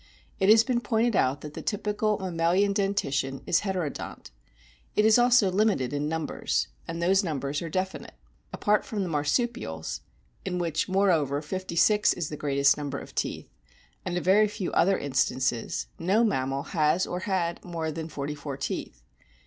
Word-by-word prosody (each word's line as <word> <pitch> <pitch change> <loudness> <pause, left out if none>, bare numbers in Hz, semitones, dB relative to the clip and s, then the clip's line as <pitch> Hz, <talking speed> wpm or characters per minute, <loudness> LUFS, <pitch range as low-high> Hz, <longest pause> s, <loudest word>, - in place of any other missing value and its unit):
It 190 - +3
has 220 +1 +8
been 240 -1 0
pointed 230 -1 +1
out 135 0 +2
that 150 -1 -8
the - - -6
typical 210 0 -1
mammalian 185 +2 +1
dentition 140 -10 -1
is - - +3
heterodont. 185 - -4 0.6
It 210 - +4
is 220 +2 +6
also 240 -5 +5
limited 190 - +1
in 145 +1 -1
numbers, 155 - -1 0.2
and 165 - -4
those 190 +3 +3
numbers 145 -4 -2
are 170 - -4
definite. 185 +3 -3 0.4
Apart 210 0 +1
from 205 -3 -3
the 180 - -3
Marsupials 145 - -1 0.4
(in 180 -2 -2
which, 165 0 -1
moreover, 170 -8 +2
fifty 185 +2 -5
six 210 +4 +4
is 170 -4 -4
the 150 - -5
greatest 140 -1 +2
number 145 -2 -4
of - - -10
teeth) - - -3 0.5
and 180 - -2
a - - 0
very 200 +5 +4
few 200 -3 -4
other 195 +2 +3
instances, 130 -3 -1
no 195 +7 +2
mammal 135 - 0
has 160 +2 +2
or 180 - -4
had 180 -3 -2
more 165 -3 -3
than 160 +1 -5
forty 145 0 -4
four 145 -2 -6
teeth. 60 - -5
175 Hz, 165 wpm, -27 LUFS, 145-200 Hz, 0.6 s, has